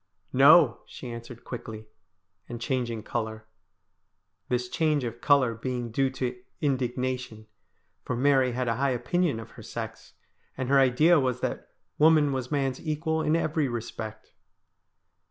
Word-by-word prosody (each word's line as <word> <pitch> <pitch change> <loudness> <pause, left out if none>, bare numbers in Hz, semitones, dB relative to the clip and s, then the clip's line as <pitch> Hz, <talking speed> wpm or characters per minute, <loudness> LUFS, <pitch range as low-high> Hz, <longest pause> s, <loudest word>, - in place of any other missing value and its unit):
' - - -42
No,' 145 -5 +7
she 125 - -8
answered 115 +1 -9
quickly, 110 -3 -7 0.6
and 120 -1 -6
changing 120 -3 -2
colour 110 -1 -4 0.5
— - - -51
this 125 0 0
change 155 0 +1
of 120 0 -5
colour 135 -5 +4
being 120 0 -4
due 135 +3 +1
to 125 -1 -4 0.2
indignation, 125 -4 -2 0.6
for 125 - -3
Mary 130 -1 +3
had 125 0 -2
a 115 -1 0
high 140 +1 +1
opinion 130 +3 0
of 110 - -10
her - - -12
sex, - - -7 0.4
and 130 -1 -3
her 140 0 +5
idea 150 +6 +5
was 125 -2 -1
that - - -3 0.3
woman 150 -2 +5
was 130 -2 -3
man's 135 -3 -1
equal 160 0 -1
in 155 0 +2
every 155 -3 0
respect. 110 -2 -6
125 Hz, 150 wpm, -27 LUFS, 120-140 Hz, 0.6 s, No